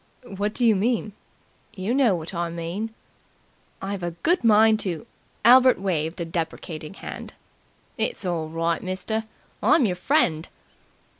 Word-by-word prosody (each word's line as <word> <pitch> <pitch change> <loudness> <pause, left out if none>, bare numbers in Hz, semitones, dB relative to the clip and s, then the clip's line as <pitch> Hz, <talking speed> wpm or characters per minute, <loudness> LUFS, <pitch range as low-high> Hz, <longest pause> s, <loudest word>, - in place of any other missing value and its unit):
"What 205 +2 -2
do 245 - +1
you 225 -2 +5
mean?" 215 +1 0 0.6
"You 195 +4 -2
know 255 -7 +4
what 165 +2 -4
I 170 -1 -2
mean." 170 +7 -4 0.9
"I've 195 0 -3
a 175 - -2
good 345 -3 +2
mind 220 -1 +5
to 185 +1 -3 0.2
" - - -18
Albert 255 +2 +7
waved 170 -3 -2
a 170 - -2
deprecating 165 0 -5
hand. - - -8 0.6
"It's 485 - -1
all 165 -3 -2
right, 165 +1 -1
mister. 190 +4 -3 0.4
I'm 315 -6 +4
yer 190 - +1
friend." 180 - +1
190 Hz, 145 wpm, -24 LUFS, 170-225 Hz, 0.9 s, Albert